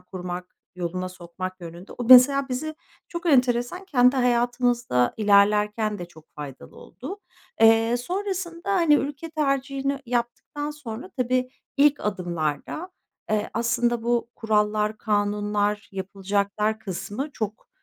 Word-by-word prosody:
kurmak, 180 -1 -7 0.2
yoluna 180 +1 -3
sokmak 185 +1 -7
yönünde. 170 +2 -10
O, 245 - -5
mesela, 265 +3 +7
bizi 310 +5 -3 0.3
çok 340 0 -5
enteresan, 250 +4 +2
kendi 255 -5 +4
hayatımızda 245 - +1
ilerlerken 210 0 +3
de 175 - -5
çok 160 -2 -17
faydalı 145 -3 -9
oldu. 300 - -9 0.4
Eee, 225 +1 +5
sonrasında, 360 +3 -3
hani, 335 -5 +5
ülke 290 +3 -2
tercihini 275 -2 -1
yaptıktan 245 +5 -3
sonra 275 +2 -8
tabii, 255 0 0 0.3
ilk 290 0 +4
adımlarda, 175 - -3 0.4
eee, 215 0 0
aslında 235 0 +1
bu 235 0 0
kurallar, 215 -1 +1
kanunlar, 205 0 0
yapılacaklar 200 +2 -1
kısmı 220 - -5
çok, 215 -2 -5
230 Hz, 115 wpm, -25 LUFS, 205-270 Hz, 0.4 s, mesela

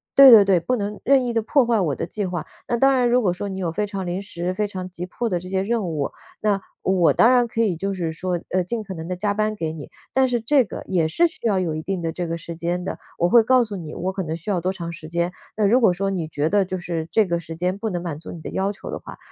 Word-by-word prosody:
对 275 -1 +10
对 215 -4 +9
对， 190 -3 +4
不 250 +10 0
能 205 0 -4
任 270 0 +4
意 240 - -2
地 225 - +2
破 260 +4 +3
坏 230 -1 +2
我 155 -8 0
的 - - -3
计 205 +5 -4
划。 175 -2 -4 0.2
那 240 - +1
当 270 +3 +5
然 250 -2 +3
如 250 +1 +4
果 180 -4 +2
说 200 +3 -4
你 190 - -5
有 175 -3 -1
非 210 +4 0
常 195 -2 -4
临 180 +2 -2
时， 180 -2 -4
非 210 +2 -1
常 185 -2 -6
急 180 0 -6
迫 235 +6 -3
的 180 -5 0
这 180 +1 -9
些 190 0 0
任 225 0 0
务， 150 -4 -2 0.3
那 205 -2 +1 0.2
我 185 -3 +3
当 235 - +5
然 245 -1 +4
可 225 0 -1
以 205 -6 +2
就 195 +3 -2
是 170 -3 -2
说， 175 +2 -2
呃， 185 - +2
尽 220 +5 -3
可 195 -2 -7
能 165 -2 -7
地 180 - -2
加 205 +3 0
班 215 +1 0
给 160 -6 -3
你。 155 -3 -9 0.2
但 265 0 +4
是 240 -1 +1
这 260 +4 +3
个 195 - -7
也 170 -4 +1
是 335 - +3
需 330 -8 -5
要 205 -3 +2
有 170 -4 -1
一 155 - -3
定 190 +3 -3
的 165 -1 -2
这 175 +1 -4
个 165 0 -2
时 170 +1 -7
间 175 +2 -2
的， - - -4 0.2
我 175 - +2
会 235 +4 +7
告 255 +2 +4
诉 215 -3 -6
你， 160 -4 -7
我 185 +2 -2
可 190 - -3
能 160 -2 -3
需 190 +6 -4
要 185 - +1
多 185 +2 0
长 170 -3 -6
时 155 -2 -9
间。 170 +1 0 0.3
那 215 - +2
如 230 +6 +5
果 220 - +6
说 195 +2 -1
你 175 -5 -2
觉 150 -1 -1
得 205 +1 +3
就 185 0 -3
是 170 -3 -4
这 220 - +4
个 170 -2 -1
时 165 -1 -8
间 180 +4 -1
不 220 - -2
能 175 -3 -3
满 160 -4 -4
足 160 - -9
你 170 - -8
的 - - -7
要 195 +1 0
求 200 - -9
的 - - -4
话， - - -11
190 Hz, 330 characters per minute, -23 LUFS, 170-215 Hz, 0.3 s, 对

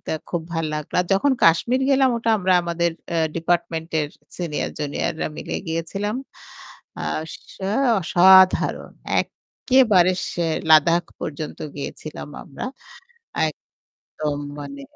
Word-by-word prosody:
তা - - -2 0.2
খুব 175 -2 -2
ভালো 165 -1 -1
লাগলো। 150 -1 -6
আর - - -11
যখন 275 +8 +2
'কাশ্মীর' 235 +11 +3
গেলাম 265 -1 +4
ওটা 230 0 0
আমরা 185 -1 +2
আমাদের 170 0 0 0.2
এ্যা 165 -1 +1
ডিপার্টমেন্টের 165 -2 -1 0.3
সিনিয়র 170 -4 -3
জুনিয়ররা 155 +2 -2
মিলে - - -5
গিয়েছিলাম। 165 +6 -3 1.0
আস 160 +1 -4 0.4
আ - - -1 0.3
অসাধারণ 185 +2 +5 0.3
একেবারে 215 -9 +2 0.2
সেই 165 -2 0
'লাদাখ' 165 +3 +5
পর্যন্ত 155 0 -5 0.2
গিয়েছিলাম 145 +1 -7
আমরা। 145 - -7 0.8
এক 155 - -5 0.6
দম 150 -2 -1 0.2
মানে 140 -1 -8
170 Hz, 115 wpm, -22 LUFS, 155-190 Hz, 1.0 s, অসাধারণ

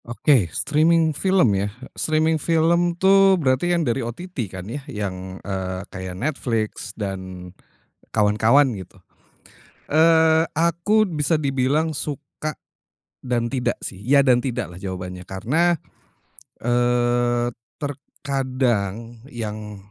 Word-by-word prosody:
Oke, 120 - +2
streaming 160 - +2
film 185 - +3
ya. 100 +1 0 0.2
Streaming 155 0 +1
film 170 +1 +2
tuh 195 0 +5
berarti 135 +1 +1
kan 170 -2 +1
dari 125 +1 0
OTT 150 +11 -7 0.2
kan 95 -1 -8
ya 125 +8 -5
yang, 95 -5 -5
eee, 95 -1 -3
kayak, 95 -1 -6
Netflix 115 -6 -2
dan 95 -3 -6 0.6
kawan-kawan 110 +6 +4
gitu. 95 0 -11 0.9
Eee, 160 +1 +5
aku 170 +6 +3
bisa 155 -1 +1
dibilang 145 +2 0
suka 150 +1 -5 0.7
dan 120 -2 0
tidak 130 -2 -1
sih, 95 - -6
ya 140 +5 +4
dan 125 -3 +3
tidak 120 - -3
lah - - -10
jawabannya. 90 -1 -6
Karena, 155 - +1 0.8
eee, 120 0 +1 0.3
terkadang 125 -6 -3
yang 105 -3 -6
125 Hz, 110 wpm, -22 LUFS, 105-155 Hz, 0.9 s, tuh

